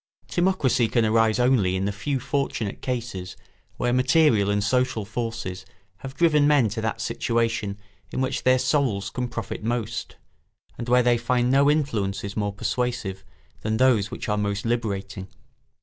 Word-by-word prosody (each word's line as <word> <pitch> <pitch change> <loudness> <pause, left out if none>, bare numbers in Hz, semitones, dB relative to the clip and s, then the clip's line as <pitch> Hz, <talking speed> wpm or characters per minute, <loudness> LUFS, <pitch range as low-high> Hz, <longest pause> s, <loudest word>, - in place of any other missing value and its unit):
Timocracy 175 -10 +2
can 115 -3 +3
arise 110 0 +3
only 125 -7 +3
in 95 +1 -1
the 100 - 0
few 135 +7 -2
fortunate 125 -6 -2
cases 115 -8 -4 0.4
where 120 0 0
material 125 -5 +3
and 105 0 +1
social 125 -1 0
forces 110 -4 -4 0.3
have 135 +6 -9
driven 150 -2 +4
men 145 -7 +4
to 110 +2 -4
that 110 +1 -2
situation 115 -3 -1 0.3
in - - -3
which 130 0 -1
their 130 0 +4
souls 125 -6 0
can 125 -1 -2
profit 115 -2 -6
most, 115 -1 -3 0.6
and 120 - -6
where 125 0 +5
they 120 -1 +3
find 125 +1 +1
no 140 +2 +5
influences 105 -9 -1
more 105 -1 -1
persuasive 105 -3 -3 0.4
than 110 0 -1
those 115 -5 +3
which - - -6
are 105 -1 0
most 100 0 -2
liberating. 100 -5 -2
115 Hz, 155 wpm, -24 LUFS, 105-130 Hz, 0.6 s, where